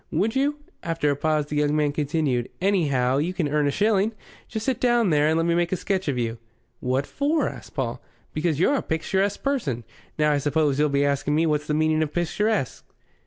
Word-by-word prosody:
"Would 220 +4 0
you?" 280 +2 +1 0.3
After 165 -3 0
a - - 0
pause 155 +1 0
the 150 0 -4
young 150 0 +2
man 150 -1 +2
continued: 145 -4 -1
"Anyhow, 140 -9 +2
you 175 +5 -1
can 165 -5 0
earn 150 0 +1
a - - +3
shilling. 210 +5 +2 0.3
Just 220 -2 -4
sit 265 -2 0
down 240 -6 +3
there 150 0 +3
and 160 +1 +2
let 165 - +1
me 170 - +2
make 175 0 +1
a - - +2
sketch 190 0 -2
of 140 -3 0
you." 115 -1 -2 0.4
"What 130 +2 0
for?" 300 +2 0
asked - - -9
Paul. - - -2 0.3
"Because 155 -1 0
you're 185 - +3
a 280 - +1
picturesque 190 +5 -1
person. 150 - -1 0.3
Now, 150 -1 +3
I 145 - +2
suppose 145 0 +1
you'll 150 0 +3
be 140 0 +2
asking 140 +1 0
me 160 +2 +3
what's 150 -1 0
the 150 - 0
meaning 155 0 +2
of 155 -2 -1
picturesque?" 175 - -1
155 Hz, 215 wpm, -24 LUFS, 145-190 Hz, 0.4 s, a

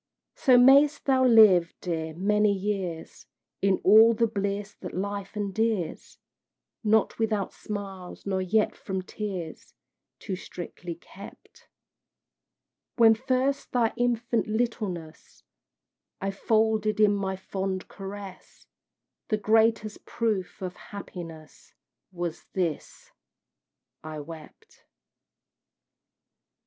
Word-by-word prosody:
So 255 -2 +4
mayst 280 +4 +6
thou 265 -2 +3
live, 205 -8 +6
dear! 160 -3 -4
many 210 +3 +2
years, 190 -4 -4 0.3
In 195 -1 +2
all 220 +3 +7
the 230 +1 +3
bliss 200 -1 -3
that 180 - -7
life 200 +2 -4
endears, 205 -3 -2 0.7
Not 220 +1 +2
without 215 -3 -1
smiles, 195 -3 -7
nor 190 -1 -1
yet 210 +4 +1
from 190 -2 -4
tears 185 -5 -6 0.4
Too 190 - -5
strictly 175 -1 -8
kept: 195 +4 -14 1.3
When 225 -2 +7
first 260 +4 -1
thy 235 -3 +2
infant 240 -1 0
littleness 210 -8 -4 0.8
I 195 +1 -2
folded 215 +1 +1
in 210 -1 +5
my 195 -1 -2
fond 190 0 -4
caress, 195 -1 -10 0.6
The 215 - +1
greatest 220 0 +2
proof 210 -5 -2
of 180 -1 -5
happiness 165 -6 -10 0.4
Was 175 -3 -5
this 170 -6 -3 0.9
I 155 -1 -6
wept. 155 +1 -12
200 Hz, 100 wpm, -27 LUFS, 185-220 Hz, 1.3 s, all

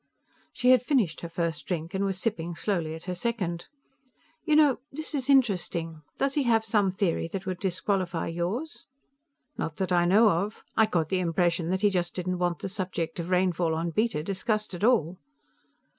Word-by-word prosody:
She 250 +1 +3
had 255 -3 +6
finished 245 - +1
her 170 - -6
first 165 -4 -3
drink 170 -1 -3
and 195 +1 0
was 195 -1 -1
sipping 175 -5 -2
slowly 170 -5 -1
at 160 - -9
her 180 - -3
second. 180 -4 -2 0.8
"You 305 - +2
know, 295 -4 +5
this 315 +3 -6
is 275 -2 -2
interesting. 180 - +1 0.2
Does 275 0 +1
he 290 - +1
have 225 -4 +2
some 210 -3 +2
theory 185 -3 0
that 190 +2 -5
would 185 -1 -3
disqualify 185 -2 -1
yours?" 185 - -4 0.7
"Not 160 - -3
that 190 -1 -2
I 175 -1 +4
know 210 +5 +6
of. 200 +5 -2
I 220 - +5
got 165 -6 0
the 190 - +1
impression 170 -1 +1
that 190 +1 0
he 205 -1 +4
just 175 -2 -1
didn't 180 0 -2
want 175 -2 0
the 195 - -5
subject 180 -4 -3
of 170 +1 -4
rainfall 180 -3 +1
on 165 +1 -2
Beta 215 -5 0
discussed 210 +3 -2
at 175 - -5
all." 190 -7 +2
185 Hz, 190 wpm, -27 LUFS, 170-215 Hz, 0.8 s, had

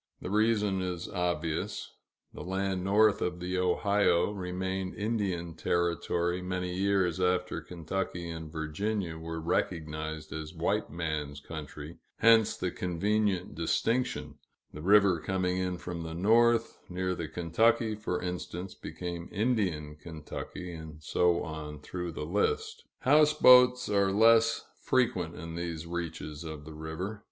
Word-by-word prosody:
The 90 - -6
reason 105 -3 +2
is 90 -1 -3
obvious; 85 -3 -2 0.4
the - - -8
land 95 0 -2
north 105 +2 +4
of 90 0 -1
the 90 +1 -2
Ohio 100 +1 +2
remained 95 -1 -3
Indian 100 -6 -2
territory 85 +1 0
many 90 0 -3
years 95 -2 +1
after 90 0 +1
Kentucky 90 +1 -4
and 80 -2 -6
Virginia 85 +2 -2
were 80 0 -5
recognized 80 -2 -2
as 80 0 -6
white - - 0
man's 75 -3 -3
country, 75 0 -8 0.2
hence 115 -1 +5
the 90 - -2
convenient 95 0 0
distinction 115 - -1 0.3
the 75 - -7
river 100 -1 +5
coming 90 +1 -1
in 90 -1 -1
from 90 -1 -6
the 80 0 -5
north, 115 +5 +3
near 90 +1 -1
the 85 -3 -4
Kentucky, 110 +8 +2
for 105 -4 -2
instance, 90 +1 -4
became 85 -1 -6
"Indian 95 -9 0
Kentucky," 85 +3 -7
and 80 -1 -9
so 85 +2 +2
on 75 -1 -6
through 90 +3 -5
the 75 - -5
list. 435 - -1 0.2
Houseboats 130 -4 +6
are 100 -1 +2
less 115 +2 +5 0.2
frequent, 95 -10 +1
in 85 +1 -7
these 85 -1 -4
reaches 85 -3 -5
of 80 -2 -7
the 80 - -9
river. 80 +7 -5
90 Hz, 130 wpm, -30 LUFS, 80-100 Hz, 0.4 s, Houseboats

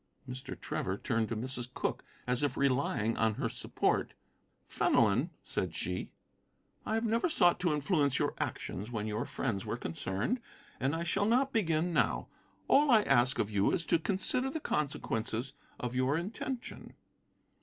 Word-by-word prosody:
Mr. 130 +2 -6
Trevor 95 +1 -2
turned 115 -2 0
to 115 - -2
Mrs. 125 +1 -4
Cooke, - - -2 0.2
as 125 +1 +1
if 145 -2 0
relying 125 -5 +1
on 110 -1 +2
her - - -1
support. - - 0 0.5
"Fenelon," 115 - +3
said 85 -4 -2
she, 90 +2 -3 0.8
"I 220 - +1
have 225 +1 0
never 230 +9 +2
sought 175 - +4
to 175 -3 +2
influence 150 -2 +2
your - - +1
actions 105 +5 -3
when 110 -3 -3
your 110 +2 -2
friends 105 -7 -2
were - - -3
concerned, 95 - -2 0.4
and 135 +4 +1
I 165 - -2
shall 195 +4 +1
not 260 +4 +3
begin 170 -5 +1
now. - - +1 0.4
All 290 +1 +5
I 220 -4 +6
ask 125 -2 +3
of 105 - 0
you 100 -1 +3
is 165 - 0
to 170 - +3
consider 205 +9 0
the 315 - -3
consequences 130 - -2 0.3
of 125 -1 -3
your 130 +3 +2
intention." 235 +8 -5
135 Hz, 160 wpm, -32 LUFS, 115-180 Hz, 0.8 s, I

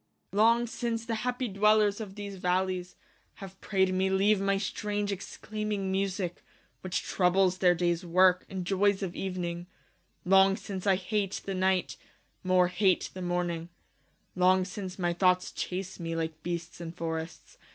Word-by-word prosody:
Long 230 +4 +4
since 235 -1 -3
the 230 - -2
happie 250 +2 -2
dwellers 210 +1 +3
of 195 -3 -7
these 200 -2 -7
vallies, 180 0 -1 0.4
Have 195 -1 -11
praide 190 -2 +1
me 190 +1 +1
leave 195 +1 +3
my 195 0 +2
strange 205 +1 -2
exclaiming 205 0 -4
musique, 190 -2 -2 0.4
Which 185 -1 -2
troubles 185 0 +2
their 180 -1 +4
dayes 175 0 0
worke, 180 +1 +4
and 190 -2 -4
joyes 200 +1 +2
of 175 -2 -4
evening: 175 -2 -4 0.6
Long 195 +1 +5
since 195 -1 -6
I 195 - +5
hate 195 +1 -2
the 195 - -3
night, 185 0 0 0.5
more 185 -1 +3
hate 185 0 +1
the 185 - -7
morning: 175 -1 -2 0.7
Long 185 0 +4
since 185 -1 -6
my 175 -2 0
thoughts 180 +1 +2
chase 185 +1 -5
me 165 -1 -3
like 160 -1 -3
beasts 170 +1 -5
in 165 -1 -6
for 165 -2 -3
rests. 160 0 -9
190 Hz, 155 wpm, -29 LUFS, 180-200 Hz, 0.7 s, Long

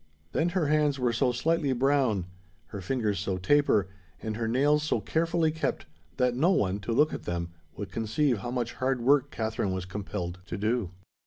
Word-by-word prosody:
Then 165 +2 +1
her 170 - +2
hands 150 -1 +2
were 125 -2 +1
so 125 +1 +2
slightly 145 +2 +1
brown, 130 -7 +2 0.4
her 100 -2 -6
fingers 105 -2 -1
so 95 -1 -2
taper, 105 -1 +3 0.3
and 110 -1 -4
her 115 0 -2
nails 145 +6 +3
so 155 - 0
carefully 165 0 +1
kept, 160 - -2 0.3
that 125 -1 +2
no 155 +8 +3
one, 100 - +1
to 105 +3 -4
look 150 +7 +3
at - - -6
them, 85 -1 -3 0.3
would 100 -3 -6
conceive 115 +3 0
how 120 - -5
much 120 -1 -2
hard 130 -1 -1
work 140 +2 +4
Katherine 110 -6 -2
was 95 -1 -3
compelled 90 -2 -5
to - - -4
do. 110 -1 0
125 Hz, 185 wpm, -28 LUFS, 105-145 Hz, 0.4 s, work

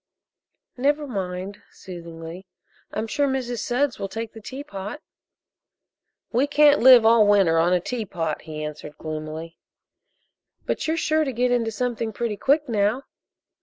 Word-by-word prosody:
"Never 290 +3 +1
mind," 195 -3 -5
soothingly, 170 0 -9 0.4
"I'm 215 - -2
sure 280 +6 0
Mrs. 250 -3 -2
Sudds 255 +4 0
will 195 - -2
take 225 +1 -5
the 225 - -11
teapot." 230 -2 -7 1.3
"We 255 +5 +2
can't 295 0 +5
live 250 -2 +8
all 225 -2 +6
winter 195 -6 +4
on 170 +2 +3
a 180 - +4
teapot," 180 -7 -3
he 155 -1 -7
answered 150 0 -7
gloomily. 155 +1 -6 1.1
"But - - -2
you're 320 +1 0
sure 315 -1 +2
to 275 - -2
get 250 +1 0
into 235 -2 +1
something 230 -1 -2
pretty 230 -1 -2
quick 290 +6 +2
now." 220 +3 +1
220 Hz, 140 wpm, -24 LUFS, 180-255 Hz, 1.3 s, live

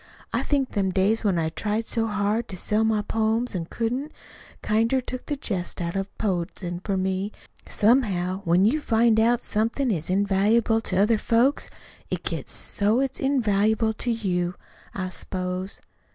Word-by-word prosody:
I - - +1
think 275 -3 0
them 195 -2 0
days 195 +5 +2
when 195 -4 +2
I 160 -1 0
tried 210 +6 -2
so 225 0 -1
hard 210 +2 0
to 185 - -6
sell 210 +4 +1
my 220 -1 +1
poems, 225 +3 0
an' 175 -3 -2
couldn't, 250 +6 -2 0.5
kinder 230 +5 +2
took 255 0 -6
the 295 - -1
jest 195 -9 -3
out 170 0 -3
of 195 0 -2
poetizin' 175 -3 -2
for 195 -2 -1
me. 190 +2 -1 0.4
Somehow, 200 -5 +2
when 175 +2 +4
you 290 +8 +2
find 225 -3 +3
out 235 +2 +3
somethin' 230 +4 0
is 165 -4 -2
invaluable 205 +4 +2
to 185 -4 -2
other 210 +3 +3
folks, 240 +7 +2 0.4
it - - -3
gets - - -4
so 210 +4 0
it's 270 -1 -1
invaluable 220 -4 +2
to 240 - -4
you, 180 -6 -1 0.4
I 185 -1 -2
s'pose. 185 +1 -4
210 Hz, 165 wpm, -25 LUFS, 190-230 Hz, 0.5 s, when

